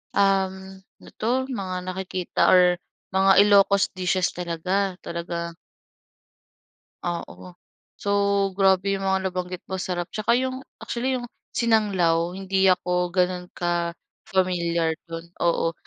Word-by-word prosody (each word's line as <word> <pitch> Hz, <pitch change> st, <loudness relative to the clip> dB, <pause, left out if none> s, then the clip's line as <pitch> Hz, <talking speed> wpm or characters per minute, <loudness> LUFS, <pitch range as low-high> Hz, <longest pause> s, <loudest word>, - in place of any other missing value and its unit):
um, 190 Hz, -1 st, +1 dB
ano -, -, -19 dB
'to 255 Hz, +4 st, 0 dB
mga 190 Hz, -6 st, -3 dB
nakikita 185 Hz, -1 st, -3 dB
or 180 Hz, -1 st, +5 dB, 0.3 s
mga 190 Hz, 0 st, +4 dB
Ilocos 200 Hz, -1 st, +4 dB
dishes 185 Hz, 0 st, +1 dB
talaga, 180 Hz, +3 st, -1 dB
talaga. 170 Hz, 0 st, -4 dB, 1.5 s
Oo. 175 Hz, -1 st, -3 dB, 0.7 s
So, -, -, -5 dB, 0.5 s
grabe 195 Hz, 0 st, +3 dB
'yong 195 Hz, 0 st, -2 dB
mga 190 Hz, 0 st, +2 dB
nabanggit 180 Hz, 0 st, -5 dB
mo 190 Hz, -, -2 dB
sarap, 175 Hz, -1 st, -3 dB
tsaka 215 Hz, +2 st, +2 dB
'yong, 260 Hz, +1 st, -2 dB, 0.2 s
actually, 255 Hz, +2 st, -2 dB
'yong 240 Hz, -1 st, -5 dB, 0.3 s
sinanglaw, 190 Hz, -7 st, +2 dB
hindi 190 Hz, 0 st, +2 dB
ako 180 Hz, -1 st, +1 dB
gano'n 180 Hz, -1 st, 0 dB
ka-familiar 170 Hz, 0 st, -1 dB, 0.2 s
do'n, 165 Hz, +1 st, -8 dB
oo. 170 Hz, -1 st, +1 dB
185 Hz, 115 wpm, -24 LUFS, 175-195 Hz, 1.5 s, or